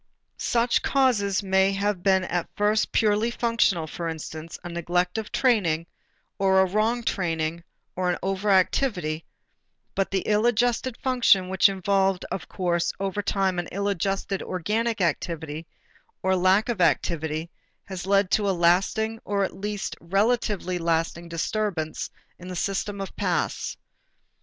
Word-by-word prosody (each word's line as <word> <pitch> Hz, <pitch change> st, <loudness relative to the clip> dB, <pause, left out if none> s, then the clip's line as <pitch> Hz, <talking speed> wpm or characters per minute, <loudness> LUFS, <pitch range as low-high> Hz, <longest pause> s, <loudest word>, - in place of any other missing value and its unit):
Such 235 Hz, 0 st, +2 dB
causes 215 Hz, -8 st, +2 dB
may 190 Hz, 0 st, +3 dB
have 200 Hz, -1 st, -1 dB
been 190 Hz, 0 st, +3 dB
at 175 Hz, -1 st, -2 dB
first 210 Hz, +1 st, +1 dB
purely 215 Hz, +1 st, +2 dB
functional: 230 Hz, -8 st, +1 dB
for 165 Hz, +1 st, -4 dB
instance, 160 Hz, 0 st, -7 dB
a 175 Hz, -, -6 dB
neglect 175 Hz, +3 st, -1 dB
of 220 Hz, -, -7 dB
training, 185 Hz, -11 st, +2 dB, 0.5 s
or 190 Hz, -1 st, +4 dB
a 190 Hz, -, +5 dB
wrong 215 Hz, +5 st, 0 dB
training, 165 Hz, -5 st, -1 dB, 0.3 s
or 185 Hz, 0 st, 0 dB
an 175 Hz, -, 0 dB
over 195 Hz, +2 st, -1 dB
activity, 185 Hz, -, +1 dB, 0.7 s
but 195 Hz, -, 0 dB
the 195 Hz, -1 st, -1 dB
ill 215 Hz, +2 st, +3 dB
adjusted 240 Hz, +1 st, +1 dB
function 235 Hz, -8 st, +3 dB
which 190 Hz, +2 st, +5 dB
involved, 195 Hz, -1 st, +1 dB
of -, -, -5 dB
course, 175 Hz, -2 st, 0 dB
every 195 Hz, +1 st, -2 dB
time 190 Hz, -3 st, 0 dB
an 175 Hz, -, -3 dB
ill 200 Hz, +2 st, -2 dB
adjusted 195 Hz, 0 st, -1 dB
organic 215 Hz, +5 st, -1 dB
activity 160 Hz, -1 st, -2 dB, 0.6 s
or 190 Hz, 0 st, +3 dB
lack 185 Hz, +3 st, +3 dB
of 230 Hz, -6 st, -1 dB
activity, 160 Hz, -1 st, 0 dB, 0.3 s
has 190 Hz, -1 st, -7 dB
led 195 Hz, -1 st, +3 dB
to 205 Hz, -2 st, +2 dB
a 190 Hz, -, 0 dB
lasting 195 Hz, +6 st, +2 dB
or 200 Hz, -1 st, 0 dB
at -, -, -3 dB
least 205 Hz, 0 st, -4 dB
relatively 195 Hz, -1 st, 0 dB
lasting 165 Hz, 0 st, -1 dB
disturbance 170 Hz, -1 st, -2 dB, 0.3 s
in 180 Hz, -, -10 dB
the 185 Hz, -, -5 dB
system 200 Hz, +2 st, -2 dB
of 195 Hz, -, -6 dB
paths. -, -, -1 dB
190 Hz, 145 wpm, -25 LUFS, 175-210 Hz, 0.7 s, a